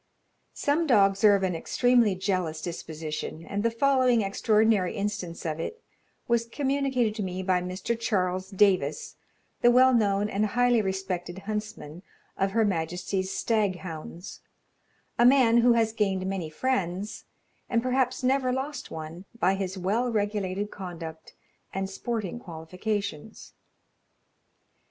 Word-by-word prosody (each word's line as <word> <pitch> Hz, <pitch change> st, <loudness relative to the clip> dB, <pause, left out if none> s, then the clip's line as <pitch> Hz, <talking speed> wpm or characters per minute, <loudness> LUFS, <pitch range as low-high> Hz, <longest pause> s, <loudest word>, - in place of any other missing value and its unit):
Some 315 Hz, +3 st, +1 dB
dogs 195 Hz, -6 st, +4 dB
are 205 Hz, -1 st, +7 dB
of 195 Hz, -, -1 dB
an 185 Hz, -2 st, 0 dB
extremely 235 Hz, +4 st, +2 dB
jealous 185 Hz, -4 st, -1 dB
disposition; 160 Hz, -1 st, -5 dB
and 200 Hz, 0 st, -3 dB
the 230 Hz, -, +2 dB
following 250 Hz, -1 st, +3 dB
extraordinary 210 Hz, -1 st, +2 dB
instance 200 Hz, -5 st, -4 dB
of 155 Hz, -1 st, -2 dB
it 455 Hz, -, -5 dB, 0.4 s
was 235 Hz, -1 st, +1 dB
communicated 265 Hz, -3 st, 0 dB
to -, -, -2 dB
me 185 Hz, -1 st, -3 dB
by 185 Hz, -1 st, +2 dB
Mr. 185 Hz, +6 st, -3 dB
Charles 185 Hz, -4 st, -1 dB
Davis, 190 Hz, -7 st, +1 dB, 0.4 s
the 240 Hz, -, +6 dB
well 255 Hz, +2 st, +6 dB
known 205 Hz, -3 st, +2 dB
and 210 Hz, 0 st, 0 dB
highly 245 Hz, +1 st, +3 dB
respected 190 Hz, -2 st, -3 dB
huntsman 210 Hz, -7 st, -5 dB, 0.3 s
of 195 Hz, -, +1 dB
Her 225 Hz, 0 st, +3 dB
Majesty's 185 Hz, +1 st, -2 dB
stag 215 Hz, -5 st, +1 dB
hounds, 170 Hz, +1 st, -8 dB, 0.8 s
a -, -, +6 dB
man 245 Hz, -2 st, +6 dB
who 235 Hz, 0 st, +5 dB
has 225 Hz, -1 st, +2 dB
gained 195 Hz, -4 st, 0 dB
many 190 Hz, -4 st, -3 dB
friends, 195 Hz, 0 st, -2 dB, 0.4 s
and 230 Hz, -1 st, +1 dB
perhaps 255 Hz, 0 st, 0 dB
never 260 Hz, 0 st, +2 dB
lost 270 Hz, +3 st, -4 dB
one, 160 Hz, +3 st, -8 dB
by 185 Hz, +2 st, +3 dB
his 190 Hz, -1 st, -3 dB
well 210 Hz, +7 st, 0 dB
regulated 205 Hz, -2 st, -1 dB
conduct 165 Hz, -4 st, -8 dB, 0.4 s
and 195 Hz, 0 st, -1 dB
sporting 220 Hz, +1 st, -4 dB
qualifications. 185 Hz, +2 st, -5 dB
200 Hz, 135 wpm, -27 LUFS, 180-235 Hz, 0.8 s, are